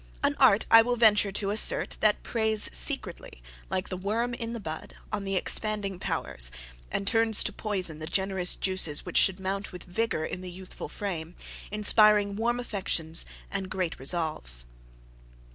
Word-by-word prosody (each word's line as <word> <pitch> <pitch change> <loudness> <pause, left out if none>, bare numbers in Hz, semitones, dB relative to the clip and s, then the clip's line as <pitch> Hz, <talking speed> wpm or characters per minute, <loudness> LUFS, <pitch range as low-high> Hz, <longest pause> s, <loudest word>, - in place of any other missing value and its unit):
An - - +2
art, 200 +2 +5
I 225 - +10
will 245 +2 0
venture 210 -3 +4
to 200 0 0
assert, 210 - +3
that 215 -1 +2
preys 220 -2 +1
secretly, - - -2 0.3
like 185 - -3
the 185 - -4
worm 225 +6 -2
in 230 -1 -5
the 235 - -5
bud, 160 -6 -7 0.2
on 205 -2 -3
the 195 0 -2
expanding 200 0 -1
powers, - - -1 0.4
and 200 - -3
turns 225 0 +3
to - - -1
poison 185 -7 -2
the 155 - -6
generous 190 0 +2
juices 185 -6 0
which - - -2
should 190 0 +3
mount 195 +1 -4
with 180 -2 -9
vigour 180 -3 -2
in 180 - -6
the 185 - -7
youthful 185 +1 -9
frame, 175 -4 -5 0.3
inspiring 210 -1 +4
warm 240 +3 0
affections 175 -8 0 0.2
and 195 -1 -3
great 185 -3 -3
resolves. 135 - 0
195 Hz, 160 wpm, -27 LUFS, 180-215 Hz, 0.4 s, I